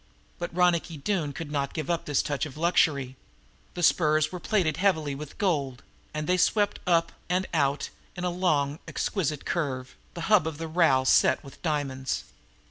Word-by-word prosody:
But 175 - -3
Ronicky 175 -2 +2
Doone 155 -1 -1
could 145 +1 -7
not 140 -2 -2
give 155 -4 -3
up 170 -1 -1
this 145 -2 +1
touch 145 +1 -2
of 145 - -12
luxury. 145 -6 +2 0.6
The 175 - -3
spurs 155 -3 +3
were 180 - -5
plated 170 -4 +1
heavily 160 -7 +1
with 145 +1 -8
gold, 140 - -1 0.3
and 150 0 -3
they 180 +3 +2
swept 205 +2 +2
up 170 -1 +3 0.2
and 180 +1 +1
out 140 -3 +1 0.2
in 180 - -5
a 180 - 0
long, 155 -5 +1
exquisite 155 -7 -2
curve, 130 -6 -2 0.2
the 170 - -5
hub 195 -1 +4
of 160 -2 -4
the 165 +1 -4
rowel 155 -6 +3
set - - +4
with 135 - -13
diamonds. 140 -5 -2
155 Hz, 175 wpm, -27 LUFS, 140-175 Hz, 0.6 s, hub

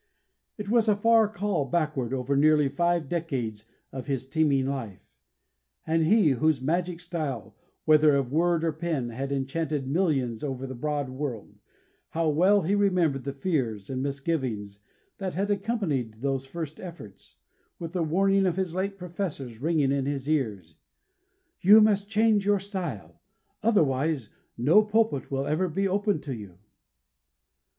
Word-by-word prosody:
It 210 -2 -6
was 230 +1 +3
a 210 - +4
far 225 +1 +4
call 200 -7 -1
backward 150 -4 -1
over 135 +1 -1
nearly 150 0 +4
five 170 +2 0
decades 130 -10 -3 0.3
of 130 +1 -7
his 135 -3 -2
teeming 140 -2 +1
life. 130 -8 -5 0.8
And 160 0 +1
he, 205 -6 +5
whose 150 +2 +2
magic 170 +5 -1
style, 145 - -4 0.3
whether 155 -1 +5
of 135 -3 -1
word 170 +2 +2
or 165 - +1
pen, 155 -6 -2
had 135 +4 -4
enchanted 140 +1 -2
millions 135 - 0
over 135 -2 -3
the 130 - -6
broad 145 +1 -2
world 130 -5 -5 0.6
how 165 -1 0
well 185 +6 +4
he 185 +5 0
remembered 180 -10 +1
the 140 - -2
fears 135 - -2
and 130 -1 -2
misgivings 135 -8 -3 0.4
that 190 -2 -4
had 200 +3 0
accompanied 175 - -2
those 135 -1 -1
first 155 0 -6
efforts, 165 - -11 0.4
with 165 0 -7
the 180 - -1
warning 195 +4 +2
of 180 0 -1
his 185 -3 -1
late 195 +2 -2
professors 170 - -5
ringing 150 -3 +2
in 140 -1 0
his 140 -1 -3
ears: 105 - -1 0.9
"You 205 +4 +8
must 205 -2 +3
change 220 -1 +3
your 205 0 +3
style, 155 - -6 0.4
otherwise 150 - +1 0.3
no 150 - +5
pulpit 215 - 0
will 135 0 -1
ever 175 +6 0
be 195 +5 0
open 200 -1 0
to 135 -4 -5
you." 100 -6 -10
155 Hz, 150 wpm, -27 LUFS, 135-185 Hz, 0.9 s, You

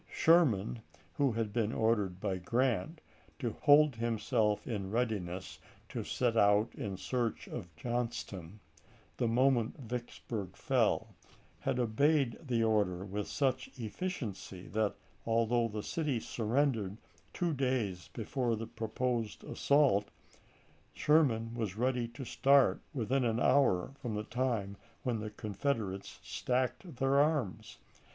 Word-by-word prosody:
Sherman, 125 - +3 0.3
who 140 -4 +2
had 110 -2 -2
been 115 -2 +1
ordered 105 -6 +1
by 95 -2 -1
Grant 125 - 0 0.4
to 120 -5 -2
hold 145 +1 +5
himself 115 -2 0
in 100 -5 -3
readiness 100 -6 -2 0.3
to - - -4
set 120 -2 0
out 105 +1 +4
in 105 -8 -4
search 120 +3 -2
of 95 -8 -6
Johnston, 110 -3 -4 0.6
the 120 - +1
moment 120 0 +2
Vicksburg 120 -5 -5
fell, - - +1 0.5
had - - -1
obeyed 130 +2 +2
the 120 -6 0
order 100 -5 +1
with 100 +1 -4
such 135 -3 0
efficiency 110 - -5
that, 110 -1 0 0.3
although 115 +1 +2
the 105 -1 -5
city 150 -5 -1
surrendered 115 -3 0 0.3
two 175 -3 -1
days 125 - -1
before 120 +1 -1
the 110 +1 -4
proposed 115 0 -2
as - - -8
sault, 140 -8 +4 0.9
Sherman 120 -7 +3
was 110 -4 -3
ready 125 0 +1
to 120 +3 -8
start 140 +2 +4
within 130 +1 0
an 115 -1 +1
hour 130 -11 +3
from 115 -4 -3
the 105 - -2
time 110 -5 -1 0.3
when 120 -3 0
the 105 0 -4
Confederates 105 -2 -3
stacked 130 +6 -2
their 135 +2 +3
arms. 145 - 0
115 Hz, 125 wpm, -33 LUFS, 105-130 Hz, 0.9 s, hold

